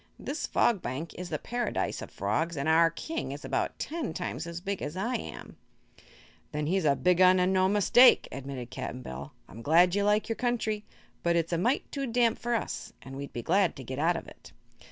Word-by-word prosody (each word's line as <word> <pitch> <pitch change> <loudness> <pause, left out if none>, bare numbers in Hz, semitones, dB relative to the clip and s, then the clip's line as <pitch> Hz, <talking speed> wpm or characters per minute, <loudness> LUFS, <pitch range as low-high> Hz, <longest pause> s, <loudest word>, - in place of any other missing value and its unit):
This 295 +2 -4
Fog 225 -6 +2
Bank 135 +7 -5
is 180 -1 -7
the - - -1
Paradise 240 -1 -2
of - - -7
Frogs 150 - -1
and 140 +2 -2
our 165 +1 +5
King 320 - -5
is - - -7
about - - -1
ten 300 - -4
times 155 +7 -4
as 170 0 -5
big 195 +1 -4
as 155 - -4
I 230 +7 -1
am." - - -6 0.9
"Then 150 0 -2
he's 185 +2 +1
a 140 -2 +4
big 180 +3 +2
un, 185 0 +7
an' 180 +1 +2
no 185 0 +3
mistake," 210 +5 +6
admitted 130 -2 -6
Cap'n 125 0 -5
Bill. 65 - -7
"I'm 115 - -11
glad 170 +6 +5
you 200 +1 +1
like 210 +1 +2
your 225 - -2
country, 220 -4 -1 0.4
but 170 0 +2
it's 165 0 0
a - - +2
mite 240 +9 +1
too 275 -2 -3
damp 235 -1 +2
for 240 0 -1
us, 225 - -4
an' 135 0 -9
we'd 140 0 -6
be 120 - -5
glad 190 - +2
to 135 - -8
get 130 +2 -5
out 170 +3 +3
of - - -8
it." - - -14
180 Hz, 215 wpm, -29 LUFS, 150-215 Hz, 0.9 s, un